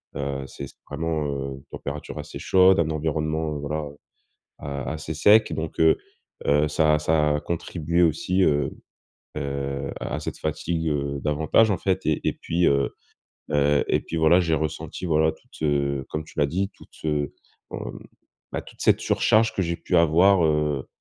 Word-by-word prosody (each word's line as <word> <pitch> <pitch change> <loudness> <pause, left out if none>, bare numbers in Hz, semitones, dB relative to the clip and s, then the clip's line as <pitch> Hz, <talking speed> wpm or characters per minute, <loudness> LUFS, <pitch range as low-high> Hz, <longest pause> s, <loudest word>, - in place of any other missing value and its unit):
heu, 70 -1 -3
c 70 +2 -7
c'est - - -17
vraiment, 80 +1 -2
heu, 70 -1 -3
une 70 - -15
température 70 +1 -6
assez - - -7
chaude, 95 -1 +5
un 80 -1 +2
environnement, 80 0 -1
heu, 75 - -4
voilà, 75 +2 -3 0.7
a 70 -1 -5
assez 80 +1 -5
sec 105 +7 +5
donc 80 0 -4
heu 80 0 +6 0.5
heu, 75 +1 +4
ça 75 0 +3
a - - +3
ça 75 -1 +2
a 75 - -3
contribué 85 0 -1
aussi, 90 +3 +2
heu 75 -4 +2 0.7
heu, 70 -1 -3
à 75 - -3
cette - - -5
fatigue, 80 +1 -2
heu, 70 -1 -2
davantage, 80 +9 +3
en 95 - +1
fait 95 -1 -1
et 80 - +1
et - - -1
puis, 85 +2 0
heu 70 0 +2 0.6
heu, 75 0 +3
et - - +2
puis, 85 - -5
voilà, 80 +3 +5
j'ai 85 -3 +2
ressenti, 80 +4 -4
voilà, 80 -1 +3
toute, - - -18
heu, 70 -3 0
comme 75 - -3
tu 80 - -9
l'as 75 - +3
dit, 95 +6 -1
toute, - - -18
heu, 75 -2 -1 0.4
mmh, - - -6 0.5
bah, - - -3
toute - - -14
cette - - +4
surcharge 110 +1 +3
que - - -1
j'ai 85 -2 -1
pu 90 - -2
avoir, 85 +3 +5
heu 75 -3 0
75 Hz, 180 wpm, -24 LUFS, 70-80 Hz, 0.7 s, heu